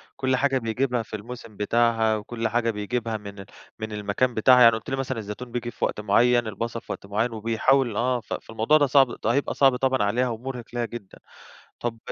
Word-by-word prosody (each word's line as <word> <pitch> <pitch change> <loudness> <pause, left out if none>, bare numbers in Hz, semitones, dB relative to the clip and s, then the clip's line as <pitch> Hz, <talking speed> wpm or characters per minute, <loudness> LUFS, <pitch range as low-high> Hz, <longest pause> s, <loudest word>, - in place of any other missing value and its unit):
كلّ 130 -1 0
حاجة 135 0 +1
بيجيبها 120 +1 -1
في 110 - -8
الموسم 115 0 -9
بتاعها، 115 0 +2
وكلّ 115 +2 -3
حاجة 115 0 0
بيجيبها 110 +2 -3
من 100 -1 -10
ال 95 - -8 0.3
من 110 0 -5
المكان 105 +4 -1
بتاعها، 125 +3 +5
يعني 115 -1 +7
قُلت 110 - -7
لي 135 - -1
مثلًا 130 -2 -3
الزيتون 110 +4 -7
بييجي 120 -1 -4
في - - -1
وقت - - -3
معيّن، 120 +3 +3
البصل 115 +3 -4
في - - -9
وقت - - -6
معيّن 110 +4 -1
وبيحاول 115 +2 +1
آه، 125 +1 +1
ف 110 - -8
فالموضوع 115 +7 +1
ده 145 - +3
صعب 135 0 +5 0.2
ده 110 - +1
هيبقى 140 - 0
صعب 135 -2 +4
طبعًا 130 -3 +1
عليها 120 +5 +1
ومرهِق 120 +1 -6
لها 120 -1 -1
جدًا. 115 -5 -10 0.6
طَب 115 -1 -3
115 Hz, 210 wpm, -25 LUFS, 110-125 Hz, 0.6 s, يعني